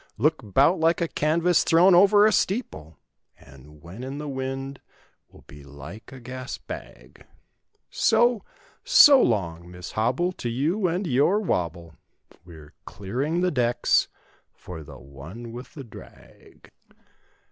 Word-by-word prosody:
"Look 150 +8 +1
'bout 135 - +2
like 165 +1 +2
a 170 - -1
canvas 165 +3 +1
thrown 175 +3 +4
over 200 +3 +6
a 215 - +4
steeple, 180 - -2 0.4
"And 70 +2 -18
when 95 +9 -10
in 135 +2 -6
the 150 0 -6
wind 135 0 -5 0.5
will - - -19
be 75 0 -15
like 70 +9 -12
a 135 - -11
gas 130 +1 -7
bag!" - - -12 0.6
So, 240 -4 +2 0.4
so 290 - +7
long, 85 -6 -1
Miss 90 0 -9
Hobble, 125 +11 0
to 125 -9 -6
you 160 - -1
and 180 +4 -2
your 155 +8 +2
"wob¬ 90 - -1
ble"— 85 -2 -15 0.5
We're 80 -4 -15
clearing 135 - -3
the 180 0 +1
decks 120 -3 +1 0.5
for 90 -3 -10
the 75 - -12
one 75 - -11
with 120 +3 -11
the 140 - -8
drag. 115 - -17
130 Hz, 140 wpm, -24 LUFS, -, 0.6 s, so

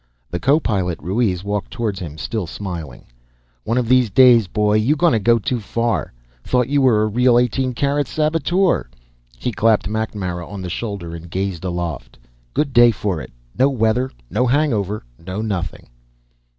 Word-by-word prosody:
The 90 - -2
co 140 - +3
pilot, 95 - -1
Ruiz, 95 +1 -1
walked 100 0 -3
toward 110 -5 -3
him, 80 -4 -7
still 105 +2 -3
smiling. 85 -9 -7 0.6
"One 115 - 0
of 125 -2 0
these 125 -1 +4
days, 120 -1 +6
boy, 105 +2 +1
you 120 +8 +2
gonna 155 -8 +3
go 115 +3 +4
too 120 +3 -2
far. 115 +2 -1 0.3
Thought 125 -1 +1
you 145 0 +2
were 115 -5 +4
a - - +1
real, 120 +3 +3
eighteen 125 +1 +1
carat 140 +1 0
saboteur." 165 - +1 0.5
He 125 - -2
clapped 110 -1 +2
MacNamara 100 -5 -3
on 100 -2 -7
the 90 - -5
shoulder 100 -5 -5
and 85 +1 -10
gazed 95 -1 -3
aloft. 85 -9 -4 0.4
"Good 140 -3 0
day 120 -1 +7
for 100 -7 -2
it. 65 - -10 0.2
No 135 - +4
weather, 125 0 +1 0.2
no 120 - 0
hangover, 115 -7 0 0.2
no 95 +4 -6
nothing." 105 -5 -4
110 Hz, 165 wpm, -20 LUFS, 95-125 Hz, 0.6 s, day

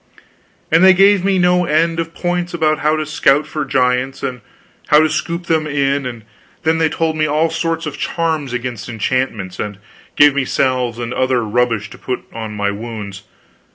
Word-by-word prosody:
And 165 +3 +5
they 190 -1 +7
gave 195 0 +5
me 195 0 +2
no 180 0 +3
end 165 +2 +1
of 165 0 -4
points 175 -1 -2
about 155 -2 +1
how 155 +1 +2
to 155 0 -2
scout 150 0 +2
for 150 0 -4
giants, 130 0 0
and 125 -3 -4 0.5
how 150 - +6
to 155 - +3
scoop 170 +3 -3
them 160 -2 0
in; 140 -2 0
and 115 -3 -8 0.6
they 160 - +3
told 160 0 -1
me 155 0 +1
all 155 +2 +1
sorts 165 0 -2
of 150 - -6
charms 160 -5 -1
against 125 -4 -4
enchantments, 110 -5 -2
and 105 -2 -4 0.4
gave 145 -1 +6
me 140 0 0
salves 125 -3 0
and 120 0 -4
other 130 -2 +1
rubbish 115 -1 0
to - - -12
put 125 -1 -3
on 110 -2 -6
my 100 -1 0
wounds. 105 -2 -7
140 Hz, 185 wpm, -17 LUFS, 125-165 Hz, 0.6 s, they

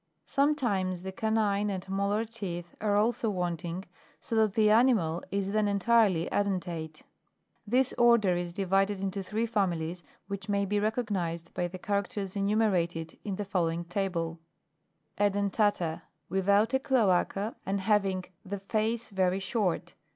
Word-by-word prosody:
(Plate - - -49
4. - - -50
fig. - - -48
3.) - - -17 0.3
Sometimes 190 -6 0
the 190 - -4
canine 210 -1 +1
and 190 -1 -4
molar 200 +3 0
teeth 180 -6 -6
are 210 -1 +2
also 225 +2 +2
wanting, 175 -1 -3 0.3
so 230 - -4
that 220 -3 +3
the 215 -1 +4
animal 215 -8 +3
is 195 0 -1
then 215 0 +2
entirely 200 -3 +3
edentate. 175 -6 -2 0.6
This 255 +4 +2
order 235 -6 +5
is 175 0 -3
divided 195 +1 +1
into 195 0 -2
three 215 +4 -1
families 180 -6 -1 0.3
which 200 +1 -6
may 200 0 +1
be 205 +1 0
recognised 200 -7 -2
by 175 - -1
the 180 +2 -8
characters 200 0 -2
enu 200 +1 +1
merated 170 -7 0
in 200 -2 -3
the 205 - -4
following 170 -3 -1
table: 170 -3 -2 0.8
(Families.) 200 0 +1
{The 180 -6 +1 2.7
face 225 +2 0
very 190 -2 +1
short. 195 -3 -1
195 Hz, 135 wpm, -29 LUFS, 180-210 Hz, 2.7 s, order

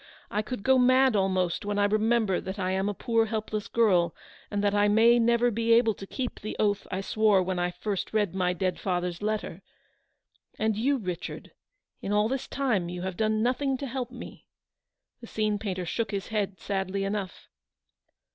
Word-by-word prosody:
I 210 - 0
could 215 -1 -6
go 265 +2 +4
mad, 255 0 +4
almost, 185 -1 +1
when 205 0 -2
I 205 - +3
remember 215 -1 +2
that 190 +2 -6
I 185 -2 -1
am 190 +2 0
a - - -2
poor 230 0 +1
helpless 215 -1 -3
girl, 185 -9 +2 0.3
and 205 -1 -2
that 205 0 +2
I 205 0 +3
may 230 +3 +5
never 235 +1 +3
be 230 +1 +2
able 230 -1 +4
to 195 - -10
keep 255 +2 -4
the 215 - -5
oath 205 -1 0
I 185 - -2
swore 210 -1 +3
when 185 0 -2
I 175 0 +1
first 195 +2 -4
read 210 -4 +1
my 180 -1 +1
dead 185 +1 -2
father's 180 -1 -2
letter. 210 -4 -3 1.0
And 220 0 +1
you, 270 +6 +1
Richard, 185 -7 -6 0.5
in 195 - -4
all 210 +1 +3
this 265 0 -3
time 225 -11 0
you 180 0 -5
have 190 -1 -3
done 215 +2 +1
nothing 265 +2 0
to 280 - -5
help 255 -1 -4
me." 245 -1 -11 0.7
The 235 - -11
scene 215 -2 -1
painter 185 -4 -3
shook 225 +6 -2
his 200 -2 -4
head 205 -3 -2
sadly 195 0 -2
enough. 195 -1 -4
210 Hz, 190 wpm, -27 LUFS, 190-230 Hz, 1.0 s, may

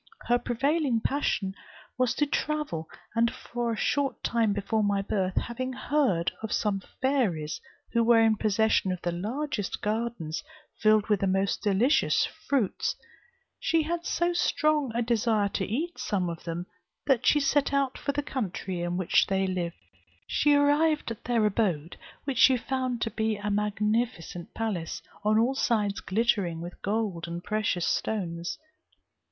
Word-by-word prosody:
Her 245 0 +3
prevailing 265 +2 +1
passion 220 -9 0 0.4
was 250 -1 +1
to 295 - +2
travel; 290 - -2 0.2
and 230 +1 +3 0.2
a 235 -1 0
short 280 +5 0
time 230 -3 +2
before 205 +2 0
my 200 -1 +1
birth, 190 -2 -1
having 255 +2 -2
heard 250 - +1
of 220 -1 -4
some 200 -2 0 0.2
fairies 205 - 0 0.3
who 235 -1 +3
were 230 0 +6
in 225 -1 +4
possession 215 -2 +2
of 180 - -3
the 175 - 0
largest 220 - -3
gardens 215 -7 -2 0.4
filled 215 -1 +4
with 210 -3 +2
the 195 - +1
most 195 +1 +1
delicious 215 +8 +3
fruits, 255 -9 -1 0.6
she 325 -1 +2
had 340 +2 -2
so 345 0 0
strong 305 -5 +1
a 240 - +1
desire 225 -3 +2
to 190 - -2
eat 320 - -3
some 185 -5 -1
of 165 - -9
them, 170 +1 -3 0.4
that 265 -4 +2
she 295 - +6
set 280 0 +2
out 275 -2 +1
for 280 - -2
the 290 +1 -2
country 190 -9 -3
in 175 +1 -1
which 185 -2 +3
they 195 0 +1
lived. 180 -2 -2 0.5
She 295 -1 +3
arrived 295 0 +3
at 230 - -8
their 235 -3 +2
abode 185 -7 0 0.3
which 270 -4 -2
she 260 - +7
found 255 -1 -2
to 225 - -2
be 220 0 0
a 205 0 -3
magnificent 210 -3 -1
palace, 200 -8 -3 0.2
on 215 +1 +3
all 235 +4 +3
sides 210 -6 +1
glittering 195 -5 +1
with 175 +1 -8
gold 200 -5 -1
and 170 +1 -5
precious 210 -5 0
stones. 175 -5 -2
220 Hz, 155 wpm, -28 LUFS, 195-255 Hz, 0.6 s, she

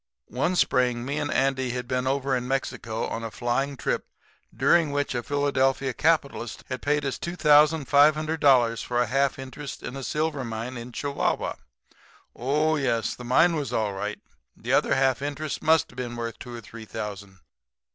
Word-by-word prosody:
"One 170 +8 0
Spring 125 -6 +2
me 140 +3 -2
and 145 -1 -2
Andy 130 -1 +1
had 125 0 -4
been 130 0 -1
over 135 0 +1
in 125 0 -2
Mexico 120 -4 -2
on 115 - -4
a 115 - -3
flying 130 +5 -1
trip - - -2 0.4
during 150 +6 +3
which 145 -1 -1
a 120 - -1
Philadelphia 135 -1 +1
capitalist 140 -6 0
had 130 -1 -4
paid 150 0 +1
us 135 - -2
$2,500 150 -5 +4
for 120 0 -1
a 120 - +3
half 135 +3 +1
interest 135 +2 -8
in 125 - -6
a 135 - -5
silver 150 -1 -1
mine 115 +2 -5
in 120 +1 -7
Chihuahua. 140 +3 -1 0.8
Oh, 150 +5 +1
yes, 120 -5 0
the 125 - -10
mine 165 +8 +4
was 145 -6 -3
all 110 -4 0
right. 105 +2 -4 0.4
The - - -3
other - - +3
half 135 -1 +2
interest 145 +1 -3
must 160 0 +3
have 125 - -18
been 120 -1 -4
worth 115 -2 -5
two 120 -1 -8
or 115 - -7
three 115 +1 -11
thousand. 100 -3 -7
130 Hz, 175 wpm, -26 LUFS, 120-145 Hz, 0.8 s, $2,500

